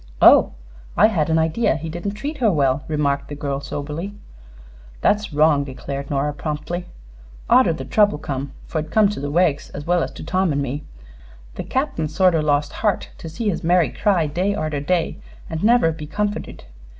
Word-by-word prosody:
"Oh. - - +7 0.4
I - - +7
had 165 -7 0
an 160 - +3
idea 160 +6 +1
he 160 +1 -5
didn't 175 +5 -4
treat 290 +8 -5
her 225 -4 +3
well," 140 -2 +1
remarked 140 -2 0
the 145 - -6
girl, 140 -1 -3
soberly. 150 +8 -5 0.9
"That's 210 0 +1
wrong," 150 -1 +3
declared 140 +1 -6
Nora, 145 +1 0
promptly. 155 +4 -4 0.6
"Arter 245 -7 +5
the 135 -4 -6
trouble 205 +2 +3
come 135 -1 -4
fer 160 - -3
it 155 0 -5
come 215 -2 +4
to 205 - -4
the 145 +1 -3
Weggs 155 -2 +1
as 145 - -6
well 175 0 +2
as - - -1
to - - -9
Tom 185 +2 +1
an' 140 - 0
me 140 +2 -3 0.7
the - - -5
Cap'n 260 - -1
sort 180 +4 +3
o' 165 - +2
lost 145 -1 +1
heart 210 -3 0
to 165 - -7
see 210 +7 -2
his 180 - -3
Mary 175 0 +3
cry 195 -6 +1
day 180 +7 -1
arter 155 -4 -2
day 170 +3 -1 0.3
an' 160 - -2
never 230 -6 +4
be 155 -1 -7
comforted. 205 +5 -3
160 Hz, 190 wpm, -21 LUFS, 145-190 Hz, 0.9 s, Oh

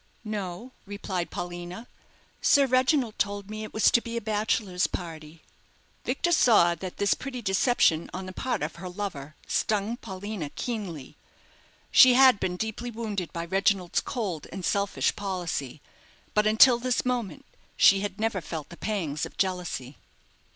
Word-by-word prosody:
"No," 210 +2 -5 0.2
replied 195 -3 -4
Paulina. 175 +5 -6 0.5
"Sir 280 -1 +5
Reginald 255 -2 +2
told 200 0 -2
me 215 0 -5
it 215 - -7
was 220 - +4
to 235 - +4
be 235 0 -5
a - - +1
bachelors' 210 -3 0
party." 160 -2 -8 0.6
Victor 345 - 0
saw 220 - +5
that 180 +2 -7
this 200 - +3
petty 260 -2 -6
deception 190 -5 +2
on 185 +1 -6
the 185 - -8
part 255 +5 -2
of - - -4
her 180 +1 -7
lover 175 -7 -6
stung 215 +2 0
Paulina 200 - -6
keenly. 195 - -5 0.7
She 255 -2 +8
had 260 -5 +7
been 180 -1 -2
deeply 220 +4 -4
wounded 210 -8 -4
by 170 0 -4
Reginald's 190 0 +1
cold 195 - -4
and 190 -2 -5
selfish 200 0 0
policy; 175 -8 -4 0.5
but 210 0 +3
until 235 +3 +6
this 250 0 0
moment 240 -9 -2 0.3
she 195 - +6
had 205 0 -4
never 220 -4 0
felt 155 -2 -6
the 170 - -11
pangs 170 -9 -2
of - - -19
jealousy. 175 -8 -2
200 Hz, 150 wpm, -27 LUFS, 175-225 Hz, 0.7 s, She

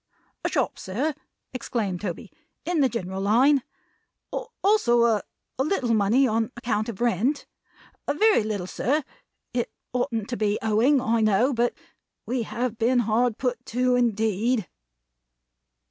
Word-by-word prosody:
"A - - 0
shop, - - -1
sir," 255 +12 -2 0.4
exclaimed 220 -7 -3
Toby, 185 -5 -5 0.3
"in 350 -2 0
the 270 -3 +4
general 190 -4 -4
line. 255 +8 +4 1.0
Also 310 - +4
a 225 -3 +3 0.4
a - - +3
little 270 -7 0
money 225 +6 +3
on 225 0 0
account 225 -3 -1
of 230 -1 -7
rent. 240 - +1 0.6
A 285 - 0
very 430 - +4
little, 210 -4 -3
sir. 285 +10 0 0.5
It 240 -1 -1 0.2
oughtn't 235 -4 -1
to 245 - -3
be 210 -1 +1
owing, 225 +6 +3
I 230 -2 +1
know, 215 +6 +3
but 240 0 +1 0.5
we 250 0 -1
have 235 +1 -3
been 245 +2 +3
hard 230 +1 +1
put 250 -2 -2
to 250 +1 +1
it, - - +3
indeed!" 220 -1 +1
235 Hz, 145 wpm, -25 LUFS, 215-255 Hz, 1.0 s, the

